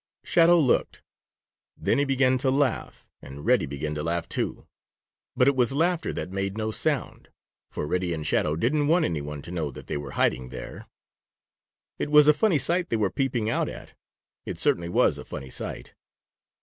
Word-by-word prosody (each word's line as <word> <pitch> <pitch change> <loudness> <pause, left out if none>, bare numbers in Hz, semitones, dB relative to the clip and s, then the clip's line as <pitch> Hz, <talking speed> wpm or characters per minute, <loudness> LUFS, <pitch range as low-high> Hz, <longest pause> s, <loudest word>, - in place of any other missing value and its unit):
Shadow 170 +1 +5
looked. 135 -6 +1 0.7
Then 115 - +1
he 145 - +2
began 130 -1 +2
to 130 - +1
laugh, 135 -2 -1
and 70 +2 -10
Reddy - - +3
began 75 +2 -4
to 75 - -3
laugh, 85 +2 -2
too. - - -3 0.7
But 125 - +3
it 140 - +4
was 125 0 +2
laughter 170 +3 +1
that 90 - -5
made 100 +1 -3
no 110 0 -2
sound, - - -2 0.4
for - - -4
Reddy 90 +3 -1
and 80 -2 -3
Shadow 75 0 +1
didn't 145 - +1
want 170 +3 +3
any 80 -4 -2
one 75 -1 -7
to 85 - -9
know 80 -4 -2
that 65 - -10
they - - -3
were 70 -2 -7
hiding 65 0 +1
there. 60 -1 -9 1.1
It - - -2
was 150 0 +7
a 150 - +8
funny 190 +1 +2
sight 175 +6 0
they 115 - +1
were 105 -3 0
peeping 125 -5 -1
out 115 - 0
at. - - -10 0.5
It - - -6
certainly 85 0 +1
was - - +2
a - - -7
funny 65 -1 -8
sight. - - -6
110 Hz, 190 wpm, -26 LUFS, -, 1.1 s, a